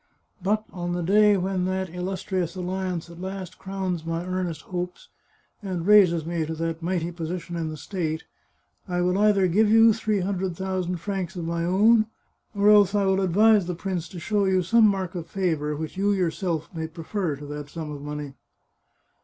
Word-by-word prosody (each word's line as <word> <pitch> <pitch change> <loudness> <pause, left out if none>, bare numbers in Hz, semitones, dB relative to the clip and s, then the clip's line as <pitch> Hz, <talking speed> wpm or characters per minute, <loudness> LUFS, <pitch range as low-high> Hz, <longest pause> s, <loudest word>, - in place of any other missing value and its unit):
But, 215 +3 0
on 175 -1 -3
the 175 0 -2
day 205 +3 +5
when 185 0 -1
that 185 -1 -2
illustrious 180 -1 -3
alliance 185 -1 -3
at 170 +1 -11
last 190 -1 -6
crowns 190 -3 -3
my 165 +1 -3
earnest 180 -4 -3
hopes, 180 0 -5 0.5
and 185 -4 -4
raises 185 -6 +5
me 170 -1 -1
to 160 +1 -4
that 165 0 -3
mighty 175 -1 -1
position 170 +1 -5
in 165 -2 -2
the 155 - -6
state, 160 0 -3 0.6
I 180 -1 -1
will 180 +1 +2
either 205 -3 +4
give 205 +5 +3
you 225 +1 +7
three 215 -2 0
hundred 185 -2 -2
thousand 185 -2 -2
francs 190 0 -4
of 175 -2 -4
my 170 0 -1
own, 215 +5 +4 0.5
or 205 +1 +5
else 205 -1 +5
I 200 -1 +2
will 190 0 +2
advise 200 +1 +4
the 180 - -2
prince 175 -2 -4
to 180 - -8
show 200 +4 +1
you 185 -1 +2
some 225 +5 +5
mark 190 -3 -1
of 170 -3 -5
favour, 160 -5 -1
which 160 +4 -6
you 200 +1 +2
yourself 175 -3 -1
may 160 -1 -3
prefer 165 0 -3
to 145 +1 -10
that 145 0 -7
sum 160 -1 -6
of 145 -1 -7
money." 150 -1 -6
180 Hz, 185 wpm, -25 LUFS, 165-195 Hz, 0.6 s, you